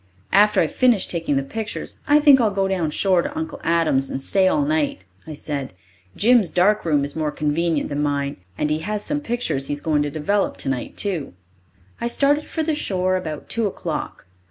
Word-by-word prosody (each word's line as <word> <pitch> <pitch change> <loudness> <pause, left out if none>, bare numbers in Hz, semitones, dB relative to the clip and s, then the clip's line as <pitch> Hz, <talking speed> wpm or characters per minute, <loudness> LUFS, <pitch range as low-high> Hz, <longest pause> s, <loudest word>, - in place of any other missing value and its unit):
"After 210 +2 +5
I've - - 0
finished 245 -7 +2
taking 165 -4 -1
the 135 - +1
pictures, 220 +9 -5
I 295 0 +5
think 285 -3 +6
I'll 220 - +3
go 195 -1 0
down 180 -5 -1
shore 185 +3 +2
to - - -5
Uncle 160 0 -5
Adam's 160 -5 +1
and - - -3
stay 190 +7 +2
all 290 +9 +2
night," 290 -2 -1 0.2
I 155 - -6
said. 140 -6 -5 0.4
"Jim's 230 -4 +4
dark 195 +5 +2
room 145 -4 +2
is 145 - -6
more 155 -2 -1
convenient 155 +1 -1
than 145 0 -2
mine, 140 -1 -1 0.2
and 150 - -1
he 155 - 0
has 210 +5 -4
some 295 0 -1
pictures 195 - -2
he - - -2
is 145 - -4
going 150 0 +1
to 145 - -1
develop 160 +8 -1
tonight, 135 -3 -3
too." 180 - -1 0.7
I 235 - 0
started 285 +4 +2
for 320 - -2
the 315 0 0
shore 185 -10 0
about 160 -5 -5
two 230 -2 0
o'clock. 190 - -5
180 Hz, 205 wpm, -22 LUFS, 150-225 Hz, 0.7 s, think